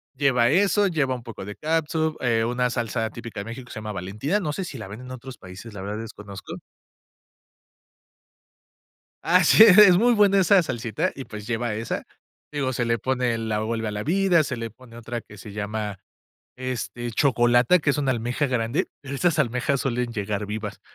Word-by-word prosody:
Lleva 125 -4 +3
eso, 200 +5 +3
lleva 150 -7 0
un 120 - -9
poco 115 -5 -8
de 105 - -7
cátsup, 160 0 -1
eh, 115 -2 +2
una 125 +1 0
salsa 115 -2 -2
típica 115 -3 -8
de - - -8
México, 120 +2 -8
que - - -14
se - - -6
llama 105 -1 -5
Valentina. 105 - -2
No 150 -6 -3
sé, 190 - -3
si 140 - -7
la 110 - -7
venden 110 +6 -9
en - - -9
otros 130 -1 -9
países, 95 +5 -11
la 100 - -7
verdad, 105 +2 -4
desconozco. 105 -3 -9 2.7
Así, 180 +5 +6
es. 205 -3 +8
Es 185 -4 +9
muy 240 +3 +4
buena 200 -2 +4
esa 190 +1 +5
salsita, 115 -7 -2
y 135 - -7
pues, 105 0 -9
lleva 120 -1 -1
esa. 115 +1 -4 0.5
Digo, 135 -3 -1
se 120 -1 -1
le 115 0 +1
pone 125 0 0
la 110 -1 -2
Vuelve 110 +1 -2
a 105 - -2
la 105 0 -4
vida. 180 0 +3
Se 135 -3 -3
le 115 0 -4
pone 115 +1 -17
otra, 120 0 -5
que 105 - -15
se 105 +1 -10
llama, 105 0 -4 0.6
este, 120 -2 -4
Chocolata, 120 +4 +4
que 150 - -1
es 140 - +2
una 135 -2 +1
almeja 120 +4 -1
grande, 120 +1 0
pero 140 0 -6
esas 165 +2 +1
almejas, 125 +1 0
suelen 125 -2 -1
llegar 105 -1 -2
vivas. 105 0 -5
120 Hz, 195 wpm, -24 LUFS, 110-145 Hz, 2.7 s, Es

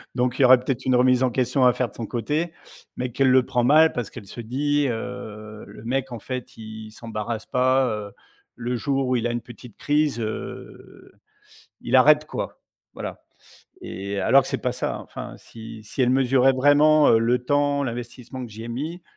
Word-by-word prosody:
Donc 125 -1 0
il - - +5
y - - +8
aurait 130 0 +8
peut 125 - -10
être 125 - -4
une 130 - +3
remise 125 0 +4
en 130 - +3
question 125 +2 +1
à 125 - +7
faire 125 - -1
de - - -21
son 115 - -5
côté, 150 +10 -2 0.5
mais 125 0 -3
qu'elle 135 +1 +3
le 130 -1 +5
prend 125 -2 0
mal 155 +5 +5
parce 120 -4 -3
qu'elle - - -10
se 120 - -8
dit, 145 +5 0
heu, 110 -3 -6
le - - -12
mec, 135 +2 -2
en 120 - -6
fait, 125 +2 -7
il 110 -1 -9
s'embarrasse 110 0 -5
pas, 130 +1 +2
heu, 105 -3 -4 0.4
le 125 +1 -3
jour 135 +2 -1
où 130 - +1
il 120 0 -1
a - - -2
une 120 0 -3
petite 120 -2 -13
crise, 150 -3 +1
heu, 110 -1 -7 0.7
il 125 - -3
arrête 150 +4 +6
quoi. - - -6 0.3
Voilà, - - -7 0.6
et 100 +1 -5
heu, - - -1
alors 135 +1 +5
que - - -8
c'est - - -2
pas 125 - 0
ça - - -3
hein. - - -7
Enfin, - - -8
heu, - - -12
si 115 -1 -11
si 110 - -6
elle 125 - +3
mesurait 130 0 +4
vraiment, 145 +3 +5
heu, 115 - +6
le 120 +2 +2
temps, 145 +1 +1
l'investissement 125 +1 -6
que - - -14
j'y 110 +2 -8
ai - - -7
mis, 155 +9 -5
125 Hz, 215 wpm, -23 LUFS, 115-135 Hz, 0.7 s, y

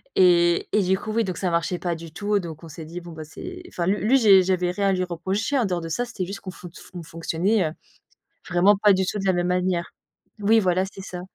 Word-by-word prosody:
et 175 -2 +4
et 210 - +3
du 190 +1 +2
coup, 215 - -5
oui, 230 0 +2
donc 185 -4 -4
ça 185 - -1
marchait 170 +2 -1
pas 175 -2 -2
du 165 -1 -10
tout, 205 +2 0
donc 165 -2 -8
on - - -9
s'est 155 +1 -9
dit: 170 +3 -7
«Bon 170 0 -10
bah, 160 -1 -8
c'est» 360 - -9
enfin, 175 0 -3
lui 200 0 +1
lui 265 +4 +5
j'ai 195 -6 +6
j'avais 180 -1 +1
rien 200 +1 0
à - - +3
lui 185 0 0
reprocher 190 - -2
en 240 - +2
dehors 180 -3 -1
de 165 - -6
ça. 245 +9 -1
C'était 205 -6 -4
juste 200 +2 -7
qu'on 185 - -7
fonc 175 -1 -11
fonction 180 -1 -10
fonctionnait, 165 +4 0
heu, - - -8 0.8
vraiment 185 +4 +5
pas 205 0 +5
du 190 0 +1
tout 210 - -2
de 195 - -4
la 190 - +4
même 175 0 0
manière. 180 -1 0 0.5
Oui, 220 +2 +4
voilà, 185 0 +1
c'est 195 0 -10
ça. 180 -2 -7
185 Hz, 265 wpm, -24 LUFS, 175-200 Hz, 0.8 s, j'ai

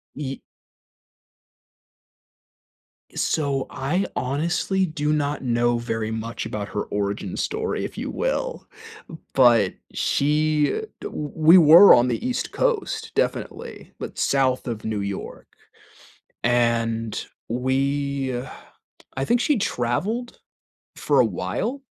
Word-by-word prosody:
Ye 135 -2 -5 2.7
So 140 -4 0
I 175 +9 -1
honestly 170 +8 0
do 150 -2 -1
not 145 -1 -1
know 120 -1 +1
very 115 -2 -3
much 110 0 -4
about 105 -2 -4
her 105 - -2
origin 100 -2 -3
story, 445 +1 -2
if - - -7
you - - -3
will, - - -2 0.7
but 120 -7 +5 0.2
she 150 - +1 0.2
w 150 -1 -5
we 160 +3 +7
were 170 +5 +9
on 120 +1 +4
the 125 - -2
East 250 - -2
Coast, 475 -4 -1
definitely, - - -3
but - - -7
south 130 -2 +1
of 115 -3 -5
New 110 -2 -2
York. 100 -1 -6 1.0
And 115 -2 0 0.3
we 135 +2 -1 0.8
I 135 - -1
think 240 0 +2
she 275 -1 +2
traveled 200 - -2 0.6
for - - +1
a - - +6
while 270 +4 -3
135 Hz, 110 wpm, -23 LUFS, 120-165 Hz, 2.7 s, were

